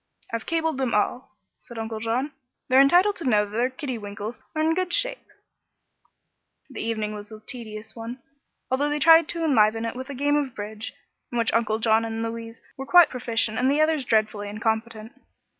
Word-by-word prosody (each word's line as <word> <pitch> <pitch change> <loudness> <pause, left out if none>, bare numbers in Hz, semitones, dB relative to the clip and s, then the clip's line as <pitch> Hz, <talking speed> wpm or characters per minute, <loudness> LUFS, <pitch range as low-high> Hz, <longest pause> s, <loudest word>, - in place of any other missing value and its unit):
"I've 230 - -3
cabled 320 -4 0
them 255 -5 0
all," 210 +4 -1 0.2
said 235 - -12
Uncle 220 0 -4
John. 235 +6 -1 0.4
"They're 260 +1 +7
entitled 355 +9 +4
to 305 -7 -1
know 210 -2 +3
that 205 - -13
their 240 +4 +1
kidiwinkles 225 -6 -6
are 310 - 0
in 320 +1 +3
good 365 +1 -1
shape." - - -1 1.4
The - - -6
evening 215 -2 -2
was 205 0 -9
a 215 - -9
tedious 220 -2 -8
one, 235 +2 -7 0.5
although 285 +3 +1
they 295 - 0
tried 325 +2 +7
to 335 -1 -3
enliven 225 -5 +3
it 230 - -4
with 260 +2 -7
a 280 - -5
game 290 +3 +2
of 270 -5 -2
bridge, 210 +2 -6 0.4
in 240 - -3
which 230 -1 +1
Uncle 220 -2 +1
John 220 0 +3
and 225 0 -3
Louise 230 0 -6 0.2
were 270 0 -6
quite 350 -2 +7
proficient 230 -3 -1
and 255 +1 +3
the 285 +2 +2
others 310 -2 +2
dreadfully 215 -3 0
incompetent. 220 +1 -2
235 Hz, 190 wpm, -25 LUFS, 220-285 Hz, 1.4 s, They're